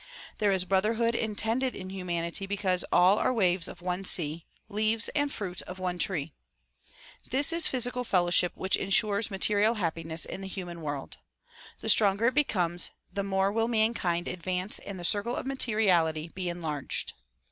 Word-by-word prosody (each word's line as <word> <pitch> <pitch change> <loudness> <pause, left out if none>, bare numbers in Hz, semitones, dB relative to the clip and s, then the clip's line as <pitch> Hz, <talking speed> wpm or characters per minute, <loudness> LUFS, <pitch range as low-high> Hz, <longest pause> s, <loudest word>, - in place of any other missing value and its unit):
There 210 - +2
is 190 -2 +1
brotherhood 220 +5 +1
intended 225 +3 -1
in 185 0 -7
humanity 180 0 -3
because 190 -3 0
all 185 +4 +5
are - - +2
waves 185 -7 +2
of - - -11
one 180 +1 -2
sea, 165 -3 +1 0.2
leaves 220 +2 +1
and 290 -1 -1
fruit 185 -7 -4
of 180 - -7
one 180 -1 -3
tree. 165 -5 -1 1.0
This 285 +5 +2
is 335 -1 +5
physical 250 -1 -1
fellowship 180 -4 +3
which 190 - +1
insures 205 +2 +2
material 210 +3 +2
happiness 165 -4 -2
in - - -7
the 195 - -6
human 175 -3 -7
world. 145 -3 -5 0.6
The - - -2
stronger 205 +1 +4
it 255 - +3
becomes, 180 - +2 0.2
the 200 - -1
more 195 0 0
will 225 +2 0
mankind 215 -7 0
advance 185 +2 -2
and 195 -2 -8
the 175 - -5
circle 205 +7 +1
of - - -4
materi 235 -5 +1
ality 165 -3 +2
be 185 -2 -3
enlarged. 160 -5 -4
195 Hz, 165 wpm, -28 LUFS, 175-220 Hz, 1.0 s, all